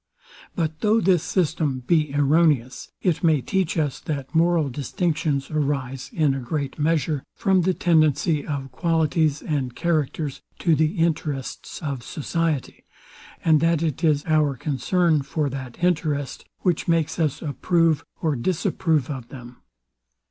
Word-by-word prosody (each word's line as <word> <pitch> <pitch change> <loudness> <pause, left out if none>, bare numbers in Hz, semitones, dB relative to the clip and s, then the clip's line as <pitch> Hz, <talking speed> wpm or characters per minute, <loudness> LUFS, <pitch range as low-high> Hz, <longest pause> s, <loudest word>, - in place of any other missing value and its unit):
But 160 -2 -2
though 215 +4 +3
this 180 -4 +3
system 155 -7 0
be 150 +2 +1
erroneous, 145 -3 +2
it 165 -5 +1
may 160 -3 +4
teach 185 +4 -1
us, 150 -4 0
that 140 -2 -5
moral 165 -2 +3
distinctions 150 +1 -1
arise, 135 -3 -2
in 150 -4 +2
a 135 - -2
great 140 +3 -4
measure, 150 -2 +1
from 190 -3 +2
the 185 +1 +1
tendency 155 -2 +2
of 135 -3 -4
qualities 160 -3 +1
and 135 -5 -2
characters 155 -3 -1 0.2
to 170 - +2
the 155 +4 +1
interests 155 -2 -2
of 140 -4 -3
society, 155 +1 -2 0.6
and 160 -2 +5
that 165 0 +2
it 155 -2 -2
is 150 -3 +2
our 155 -4 +2
concern 155 +4 +1
for 140 +1 -2
that 130 +2 -7
interest, 150 -6 0 0.2
which 180 -4 0
makes 160 -2 +1
us 155 -5 0
approve 165 +1 +1 0.2
or 155 -3 +1
disapprove 160 0 0
of 130 -5 -6
them. 125 -2 -11
155 Hz, 140 wpm, -23 LUFS, 140-165 Hz, 0.6 s, and